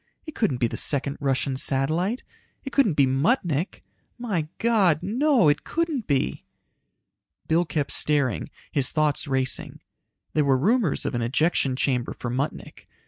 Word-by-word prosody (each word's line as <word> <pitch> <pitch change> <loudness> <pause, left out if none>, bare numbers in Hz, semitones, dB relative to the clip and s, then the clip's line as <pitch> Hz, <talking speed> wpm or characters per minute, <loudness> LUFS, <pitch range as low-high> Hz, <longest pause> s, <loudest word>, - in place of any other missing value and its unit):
"It 315 - -8
couldn't 205 - 0
be 120 - +1
the 115 - -3
second 140 -1 0
Russian 135 -1 0
satellite, 160 - 0 0.4
it 270 - -7
couldn't 220 - +3
be 140 - +5
Muttnik! 155 - 0 0.3
My 200 -11 -2
God, 200 -9 +2
no, 245 - +3
it 145 0 +2
couldn't 320 -8 -2
be!" 135 - 0 1.0
Bill 165 +2 +2
kept 150 -3 -2
staring, 145 -6 0 0.2
his 140 -4 +1
thoughts 155 -1 0
racing. 130 -1 -2 0.5
There 155 - +2
were 135 -2 +3
rumors 200 - +1
of - - -2
an 120 - -1
ejection 135 +2 +1
chamber 125 -2 0
for 120 - -5
Muttnik. 135 +4 -4
150 Hz, 145 wpm, -25 LUFS, 135-205 Hz, 1.0 s, be